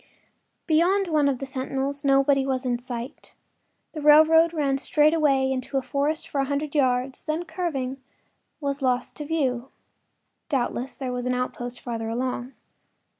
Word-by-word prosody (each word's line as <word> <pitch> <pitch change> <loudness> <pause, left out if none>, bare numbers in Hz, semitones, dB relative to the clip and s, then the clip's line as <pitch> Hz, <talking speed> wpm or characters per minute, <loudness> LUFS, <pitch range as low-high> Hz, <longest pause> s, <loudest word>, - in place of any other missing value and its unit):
Beyond 360 +4 +2
one 300 -3 +3
of 270 - -1
the 275 - -5
sentinels 270 +2 -3
nobody 275 0 +4
was 265 -1 -2
in 245 -1 0
sight; 245 +2 -7 0.6
the 310 - -6
railroad 315 +2 +6
ran 280 -4 0
straight 300 +2 +3
away 275 -4 +2
into 265 +1 -2
a 265 - 0
forest 290 +4 -1
for 280 - -1
a - - 0
hundred 285 +1 -2
yards, 260 -2 0
then, 315 +3 -2
curving, 270 -8 -3 0.6
was 280 -1 -3
lost 250 -2 0
to 295 - -5
view. 270 -5 -1 0.8
Doubtless 260 -1 -2
there 255 -2 -4
was 250 0 -3
an 250 - +1
outpost 245 -1 -3
farther 225 -2 -4
along. 250 +2 -3
275 Hz, 155 wpm, -25 LUFS, 255-300 Hz, 0.8 s, railroad